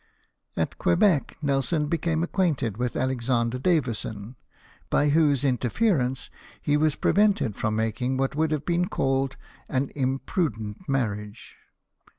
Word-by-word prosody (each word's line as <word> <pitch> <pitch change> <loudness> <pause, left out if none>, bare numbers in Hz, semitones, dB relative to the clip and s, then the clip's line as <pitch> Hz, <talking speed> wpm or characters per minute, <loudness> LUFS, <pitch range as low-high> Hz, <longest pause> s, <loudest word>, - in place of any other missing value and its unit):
At - - -2
(^)uebec 145 - +3
Nelson 145 +2 +1
became 160 +1 0
acquainted 170 - 0
Avith 125 +3 -2
Alexander 125 -1 0
Davison, 125 - -1 0.5
by 145 - +3
whose 145 -3 +3
interference 130 - 0 0.3
he 145 - +1
was 150 0 +2
prevented 200 - +2
fi*om 105 0 -1
making 115 +4 -1
what 135 +1 -1
would 160 +1 +1
have 150 -2 -2
been 175 +1 +1
called 135 0 0 0.3
an 130 +1 -1
imprudent 135 - -2
marriage. 105 -5 -3
135 Hz, 120 wpm, -26 LUFS, 120-155 Hz, 0.5 s, ^)uebec